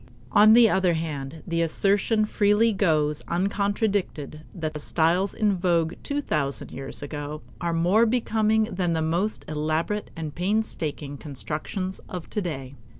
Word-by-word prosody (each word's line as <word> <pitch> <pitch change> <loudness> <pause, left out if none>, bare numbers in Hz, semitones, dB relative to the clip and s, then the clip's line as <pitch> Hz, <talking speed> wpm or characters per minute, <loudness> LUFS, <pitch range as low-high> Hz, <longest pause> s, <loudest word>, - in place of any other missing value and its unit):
On 215 +1 +7
the 235 0 +8
other 185 -4 +2
hand, 155 -2 -5
the 170 -2 0
assertion 200 +6 +2
freely 210 +2 +3
goes 155 -6 +1
uncontradicted 200 -5 -1
that 155 -4 -4
styles 175 +6 +1
in 210 -3 +2
vogue 170 -2 +1
two 290 0 -2
thousand 140 - -2
years 135 +1 -6
ago 145 0 -6 0.2
are 170 - 0
more 180 +8 +3
becoming 220 -2 +2
than 180 -5 -1
the 160 -1 0
most 175 +7 0
elaborate 155 +7 -1
and 160 -3 -5
painstaking 165 -7 -2
constructions 155 +6 -4
of 180 -3 -7
today. 150 - -3
175 Hz, 135 wpm, -25 LUFS, 155-205 Hz, 0.2 s, the